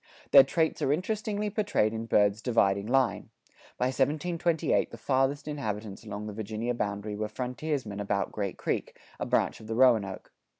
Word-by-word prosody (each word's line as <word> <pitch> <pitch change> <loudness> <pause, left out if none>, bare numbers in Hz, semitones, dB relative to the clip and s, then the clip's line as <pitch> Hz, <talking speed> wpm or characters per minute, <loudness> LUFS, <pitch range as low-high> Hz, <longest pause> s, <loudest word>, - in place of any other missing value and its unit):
Their 140 - +10
traits 160 +4 0
are 135 - +2
interestingly 210 +5 -1
portrayed 200 - +1
in 115 0 -4
Byrd's 105 0 +3
"Dividing 100 -5 +2
Line." 125 -5 +1 0.5
By 125 - +1
1728 155 +5 +1
the - - -10
farthest 135 +2 0
inhabitants 110 -9 -4
along 105 -1 -6
the 105 - -6
Virginia 110 +3 -3
boundary 105 -2 -3
were 105 +1 -2
frontiersmen 125 -1 -3
about 100 -1 -1
Great 100 -3 -3
Creek, - - -3 0.2
a - - -2
branch - - +1
of 110 - -12
the 110 - -3
Roanoke. 110 -7 +2
115 Hz, 160 wpm, -29 LUFS, 105-145 Hz, 0.5 s, Their